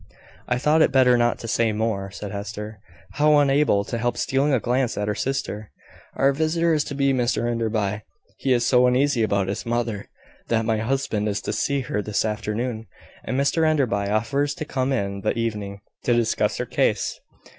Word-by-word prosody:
"I 125 - +1
thought 150 +4 +3
it - - +4
better 130 -2 +5
not 120 0 +2
to 115 - -6
say 115 0 +1
more," 105 -3 -2
said 100 0 -7
Hester, 105 +1 -6 0.4
now 150 0 +5
unable 140 -7 +3
to 115 +3 -4
help 120 +1 -1
stealing 135 +2 +1
a 130 - +3
glance 125 +1 0
at 105 - -1
her 105 - 0
sister. 120 -5 -3 0.5
"Our 135 +1 +3
visitor 160 +3 +1
is 150 -2 +2
to 140 - -5
be 140 -1 +2
Mr 120 -1 0
Enderby. 110 -3 -1 0.4
He 135 - 0
is 120 -1 +3
so 125 0 +4
uneasy 130 0 +2
about 100 -3 +1
his 100 - -3
mother, 115 -3 -2 0.4
that 115 -1 +1
my 110 -1 +1
husband 110 -2 -1
is 105 +1 -1
to - - -3
see 140 -1 0
her 115 -5 -2
this 105 +1 -1
afternoon; 110 +2 -3 0.4
and 130 +4 -2
Mr 140 +4 +2
Enderby 125 -11 +1
offers 140 +7 0
to 155 - -5
come 130 -2 -1
in 100 -6 -2
the - - -1
evening, 105 -3 -3 0.2
to 120 - +3
discuss 115 -2 +1
her - - -2
case." - - 0
120 Hz, 190 wpm, -23 LUFS, 105-135 Hz, 0.5 s, better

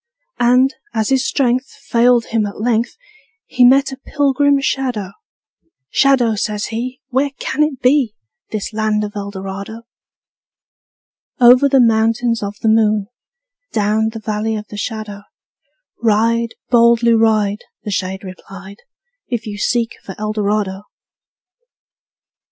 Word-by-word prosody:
And, 250 +3 +4 0.2
as 220 -1 0
his 265 -1 +1
strength 255 -1 +1
Failed 240 -3 +1
him 220 -2 -1
at 200 - -9
length, 230 +1 0 0.5
He 250 - +1
met 270 +2 +5
a 265 - -7
pilgrim 285 0 +1
shadow: 250 -8 -2 0.8
``Shadow,'' 245 -6 +3
says 210 -1 -2
he, 250 +3 -4
``Where 275 +1 0
can - - -2
it 300 -4 0
be, 250 -4 +3 0.3
This 215 0 -4
land 215 -1 0
of 205 0 -6
Eldorado?'' 200 +2 -6 1.6
Over 250 +3 +6
the 270 - +4
Mountains 230 0 +2
Of 200 0 -4
the - - +1
Moon, 215 -2 +2 0.6
Down 215 +1 +1
the 225 0 -7
Valley 215 +1 -2
of 210 0 -5
the - - -9
Shadow, 210 -1 -5 0.8
Ride, 230 +1 +1 0.2
boldly 235 -1 +5
ride,'' 215 -2 +1 0.2
The 210 - -4
shade 190 0 -3
replied, 195 +1 -11 0.5
``If 235 -1 -2
you 205 -1 -6
seek 235 +1 -1
for 190 - -8
Eldorado!'' 210 -2 -1
225 Hz, 125 wpm, -17 LUFS, 210-250 Hz, 1.6 s, Over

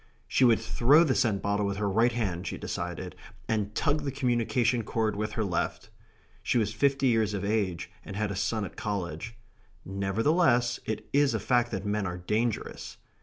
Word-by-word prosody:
She - - +2
would 120 -3 +6
throw 145 +7 +4
the 145 -6 +2
scent 105 -6 +1
bottle 100 0 +1
with 100 -1 -2
her 105 0 0
right 115 +5 +3
hand, 95 -6 -2
she - - -4
decided, 90 +1 -5 0.3
and 105 -2 -1
tug 150 -1 +1
the 140 -1 -3
communication 120 -2 +1
cord 110 -1 -1
with 105 +1 -3
her 110 - -1
left. 90 -5 -2 0.5
She - - +1
was 110 -2 +1
fifty 135 +4 +2
years 110 -3 +2
of 100 0 -3
age, 95 -5 -1
and 100 - -8
had 105 0 -1
a - - -3
son 105 +2 -1
at - - -9
college. 100 0 -4 0.5
Nevertheless, 120 - +2
it 110 -1 -3
is 140 0 +3
a - - 0
fact 120 -1 +2
that 95 -3 -4
men 105 -1 -1
are 90 0 -4
dangerous. 105 +5 -2
110 Hz, 185 wpm, -28 LUFS, 100-120 Hz, 0.5 s, would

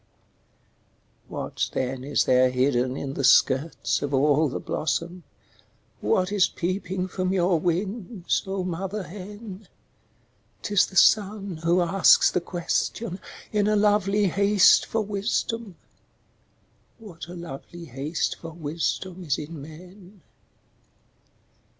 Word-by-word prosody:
What - - -3
then 130 0 -2
is 145 +1 +1
there 130 0 +4
hidden 125 0 +1
in 135 -1 -4
the 140 - -3
skirts 135 +4 +3
of 140 -1 -1
all 145 +2 +3
the - - -4
blossom, 170 +4 -3 0.8
What 185 +1 +1
is 205 -3 +3
peeping 185 +1 -3
from 185 0 -2
your 180 -2 +2
wings, 190 +3 -2
oh 190 -1 -2
mother 190 +3 -4
hen? 200 +2 -10 1.0
'T 205 - -4
is 205 - +5
the 190 - -14
sun 200 -2 +3
who 170 +3 +2
asks 180 +2 +5
the 180 - 0
question, 180 +3 -2 0.3
in 210 -1 +2
a 215 - +2
lovely 205 -1 +2
haste 200 +1 +4
for 225 - -1
wisdom 210 0 -2 1.2
What 190 -8 -11
a 175 - -9
lovely 170 +1 -9
haste 145 +4 -3
for 165 -1 -9
wisdom 170 +3 -3
is 145 -5 0
in 155 0 -7
men? 180 +5 -13
180 Hz, 120 wpm, -25 LUFS, 155-200 Hz, 1.2 s, is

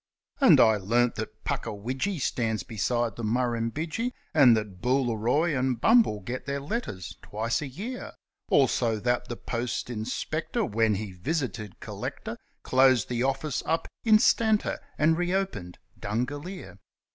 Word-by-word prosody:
And - - +7
I 110 -2 +6
learnt 115 +5 +2
that - - -6
Puckawidgee 130 - -2
stands 115 -4 -1
beside 115 +1 -1
the 115 - -5
Murrumbidgee, 125 - -1 0.2
And 130 -7 +7
that 100 -4 -5
Booleroi 125 +5 +1
and 130 -2 0
Bumble 225 - +4
get 125 +9 -6
their 140 0 -1
letters 140 - -5
twice 115 +5 -2
a 150 - -4
year, 210 - -6 0.4
Also 120 -5 +3
that 120 +2 0
the 120 - -5
post 120 +1 -3
inspector, 155 - -2
when 110 - +2
he 100 0 -4
visited 110 - -3
Collector, - - -6 0.2
Closed 130 -3 +4
the 120 -1 -1
office 135 +2 -1
up 165 +1 0 0.2
instanter, 220 -1 +3 0.2
and 160 +2 +3
re 175 +1 0
opened 105 - -3 0.2
Dungalear. 145 - -4
125 Hz, 135 wpm, -27 LUFS, 110-155 Hz, 0.4 s, And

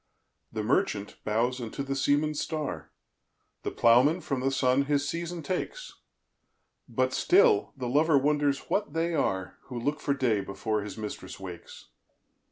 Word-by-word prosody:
The 110 -1 -3
Merchant 110 - 0
bowes 120 +4 0
unto 120 +4 -4
the 135 0 -2
Seamans 145 +3 +1
Star, 150 - -3 0.7
The - - -2
Ploughman 130 +9 +4
from 140 -4 -2
the 135 +1 +1
Sun 135 0 +2
his 145 0 +1
Season 170 +1 -4
takes; - - -4 1.0
But - - 0
still 405 +2 +4
the 125 -2 -3
Lover 150 +4 +4
wonders 145 0 +2
what 205 -8 -2
they 165 +1 0
are, 95 - -1
Who 125 -3 -6
look 145 +5 -1
for 140 - 0
day 120 -7 +1
before 105 +2 -2
his 105 +2 -7
Mistress 105 -4 -6
wakes. 90 -3 -10
140 Hz, 150 wpm, -28 LUFS, 115-155 Hz, 1.0 s, Ploughman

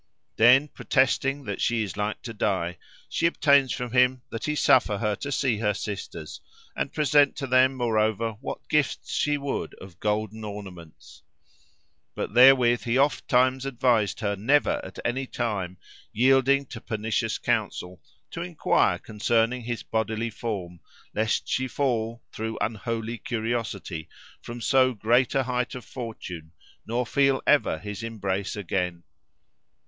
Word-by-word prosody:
Then, 125 +6 +6
protesting 135 0 +1
that 100 -5 -5
she 115 -2 +1
is 100 - -6
like 105 +1 -3
to 115 - -6
die, 90 -6 -1 0.3
she 165 - +1
obtains 140 -5 +3
from 125 -1 -4
him 125 0 +3
that 115 - -4
he 150 - -1
suffer 115 -7 +4
her 105 0 0
to 140 - -5
see 130 -6 +1
her 105 -2 +1
sisters, 95 -7 -6 0.3
and 140 - -2
present 145 -1 +3
to 135 - -4
them 130 +1 +4
moreover 110 -2 +1
what - - -6
gifts 150 -4 0
she 145 0 +1
would 140 -1 -4
of 95 -2 -13
golden 110 +1 -2
ornaments; 95 -6 -10 0.9
but - - -4
therewith 125 -1 +6
he 120 +1 +1
ofttimes 130 -2 +2
advised 125 -6 +1
her 100 -2 0
never 130 +9 +2
at - - -10
any 130 +2 -1
time, 100 -8 -3 0.3
yielding 135 +3 +3
to 115 -2 -9
pernicious 110 -1 -2
counsel, 90 0 -2 0.3
to 170 - -5
enquire 175 -2 +1
concerning 115 +3 0
his 120 0 -4
bodily 110 +1 -2
form, 95 -6 -5 0.3
lest 110 +1 0
she 130 0 0
fall, 115 -3 -1
through 110 0 -4
unholy 115 +2 -3
curiosity, 110 -8 -3 0.3
from 120 0 -8
so 130 0 +3
great 120 +5 +2
a 135 - +3
height 125 0 -2
of 125 - -8
fortune, 90 -10 -7 0.4
nor 120 +2 -1
feel 135 +1 +2
ever 145 - +3
his 105 +6 -7
embrace 100 -4 -3
again. 90 -3 -2
115 Hz, 145 wpm, -26 LUFS, 105-130 Hz, 0.9 s, Then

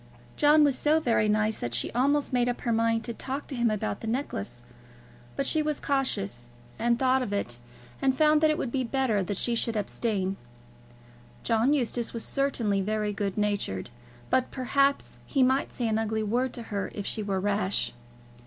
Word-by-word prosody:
John 300 +1 +5
was 285 -3 +3
so 300 +4 +3
very 230 -7 +2
nice 215 +1 +2
that 120 0 -2
she - - 0
almost 280 +3 +1
made 245 -1 +2
up 245 - -3
her 235 - -1
mind 230 0 +2
to 235 - -4
talk 270 +4 -4
to 275 - -6
him 240 -1 +2
about 195 - -2
the - - -5
necklace; 120 - -3 0.7
but 275 - -1
she 310 +3 +3
was 300 -1 -1
cautious, 200 - -1 0.3
and 235 +1 +2
thought 260 +1 +3
of 245 - -3
it, 120 -12 -2 0.4
and 265 -1 +2
found 305 0 +4
that 310 - +5
it 305 - +1
would 240 - -3
be 260 0 0
better 245 -4 +1
that 190 +1 -3
she 240 - 0
should 230 -1 0
abstain. 200 -2 -1 1.1
John 230 +3 +2
Eustace 245 -4 0
was 230 -2 -2
certainly 235 -8 0
very 210 +1 -1
good 200 -1 -3
natured, 205 - -1 0.4
but 255 -1 +2
perhaps 275 +2 +1
he 270 -3 +2
might 260 +2 +2
say 240 - -2
an 220 0 +1
ugly 220 0 -1
word 245 +5 0
to 235 - -6
her 200 -1 -2
if 205 - -4
she 220 - 0
were 200 -2 -1
rash. 200 0 0
230 Hz, 190 wpm, -27 LUFS, 205-265 Hz, 1.1 s, John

